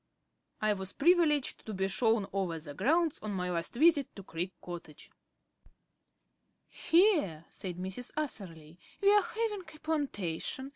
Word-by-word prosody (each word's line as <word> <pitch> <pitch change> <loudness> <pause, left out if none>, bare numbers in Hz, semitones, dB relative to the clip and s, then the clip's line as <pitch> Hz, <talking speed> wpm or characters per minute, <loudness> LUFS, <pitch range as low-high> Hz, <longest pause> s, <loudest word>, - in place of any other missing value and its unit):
I 215 -1 +3
was 190 -1 -4
privileged 315 -3 +3
to 215 - -4
be 190 0 0
shown 220 +1 +2
over 185 -4 -1
the 150 -2 -7
grounds 320 - +2
on 215 -1 -4
my 180 -1 -2
last 170 +5 -3
visit 300 0 +4
to 195 - -9
Creek 175 +1 -4
Cottage. 170 -4 -9 1.6
"Here," 325 - +2
said 180 -3 -5
Mrs. 190 +7 -5
Atherley, 170 - -5 0.2
"we 400 0 +5
are 415 - +6
having 435 +1 -2
a 315 -3 -14
plantation. 265 - -2
215 Hz, 140 wpm, -31 LUFS, -, 1.6 s, are